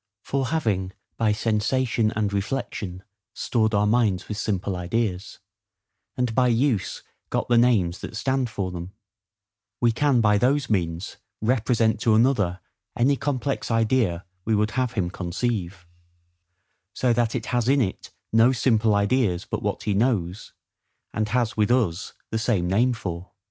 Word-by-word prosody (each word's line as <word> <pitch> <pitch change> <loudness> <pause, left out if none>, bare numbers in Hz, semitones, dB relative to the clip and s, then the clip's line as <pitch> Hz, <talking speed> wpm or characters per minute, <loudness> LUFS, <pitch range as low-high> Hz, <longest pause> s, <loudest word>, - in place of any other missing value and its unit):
For, 135 -1 -1
having 100 - -1 0.2
by 110 -2 +1
sensation 110 +1 +1
and 105 -2 0
reflection 100 -3 -3 0.3
stored 110 -3 0
our 100 +1 +3
minds 105 -4 +1
with 105 - -4
simple 100 -2 -2
ideas, 95 +1 -2 0.8
and 125 -2 0
by 125 +1 +3
use 120 -3 0 0.3
got - - -2
the 120 - +4
names 100 -8 +2
that - - -7
stand 130 +2 0
for 95 -4 -3
them, 90 +2 -7 0.9
we 120 -1 +3
can 135 +1 +2
by 105 -2 +3
those 135 +2 +1
means 85 -3 -2 0.2
represent 115 -1 +1
to 110 -1 +3
another 105 -7 +2 0.4
any 135 +4 +3
complex 140 0 -2
idea 115 -6 +1 0.2
we 110 +2 +1
would 105 +1 +1
have 125 -2 -1
him 90 -6 -1
conceive; 95 -1 -3 1.1
so 125 -2 +1
that 120 0 0
it 115 - -3
has 120 0 +1
in 140 +1 +4
it 100 -7 -2 0.2
no 115 +3 +6
simple 115 -4 +2
ideas 100 -3 +1
but - - -4
what - - -2
he 105 - 0
knows, 100 -3 0 0.6
and 110 0 -1
has 120 -1 0
with 105 0 +2
us 105 -7 0 0.2
the 110 - 0
same 105 -6 0
name 115 +8 +3
for. 90 -5 -6
110 Hz, 150 wpm, -24 LUFS, 100-125 Hz, 1.1 s, no